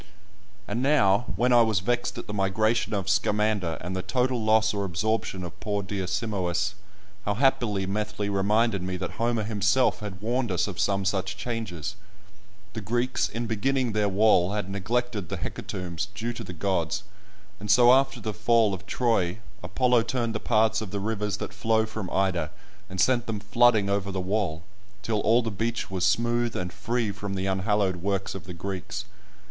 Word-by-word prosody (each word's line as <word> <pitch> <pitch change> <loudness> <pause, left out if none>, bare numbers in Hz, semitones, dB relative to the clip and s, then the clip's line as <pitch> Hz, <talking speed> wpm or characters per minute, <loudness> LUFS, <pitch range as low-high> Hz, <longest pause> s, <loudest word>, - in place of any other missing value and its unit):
And 120 - -2
now, 120 -6 +4
when 125 +5 +3
I 120 - +7
was 110 -4 +3
vexed 120 +5 -1
at - - -5
the 105 - -6
migration 105 +3 +1
of 95 -2 -2
Scamander, 105 -3 +1
and 90 +2 -4
the 95 - -1
total 125 +1 0
loss 110 0 +3
or 100 -1 -1
absorption 100 +1 -1
of 85 -1 -8
poor 105 -1 -2
dear 95 -1 -3
Simois, 100 -3 -1 0.5
how 105 - -1
happily 115 -6 +2
Methley 105 +1 -2
reminded 100 +1 +2
me 90 0 -3
that 95 - -4
Homer 115 -1 0
himself 105 +4 +2
had 100 -3 -7
warned 120 +1 -1
us 90 - +1
of 95 -4 -6
some 100 0 +1
such 95 -1 -1
changes! 100 -6 -4 0.8
The 110 - -5
Greeks 120 +5 0
in 115 +3 -3
beginning 125 +3 0
their 105 -1 +1
wall 100 -2 +4
had 105 -2 -3
neglected 105 0 -2
the - - -3
hecatombs 90 +1 -4
due 120 +2 -3
to 115 - -7
the 95 - -7
gods, 90 -1 -1 0.6
and 105 +1 -7
so 120 +4 +7
after 135 -1 +3
the 110 -1 -4
fall 110 0 +3
of 95 +1 -7
Troy 110 -6 +1 0.2
Apollo 120 +6 +2
turned 115 0 -1
the 110 - -2
paths 110 0 +2
of 110 - -5
the 100 - -3
rivers 105 0 -2
that - - -6
flow 110 +1 +2
from 110 -4 -5
Ida 90 -5 0 0.4
and 95 0 -6
sent 120 +5 +3
them 110 -2 -2
flooding 105 0 +4
over 100 0 0
the 95 - -3
wall, 90 -4 -1 0.4
till 110 -1 0
all 115 +4 +3
the 115 - -2
beach 110 +2 -2
was 95 -2 -2
smooth 120 +5 +2
and 90 -1 -3
free 115 -2 -1
from 100 0 -5
the 95 0 -2
unhallowed 95 0 +1
works 100 +2 -2
of 95 -2 -8
the 90 -2 -8
Greeks. 95 +1 -5
105 Hz, 185 wpm, -26 LUFS, 95-115 Hz, 0.8 s, I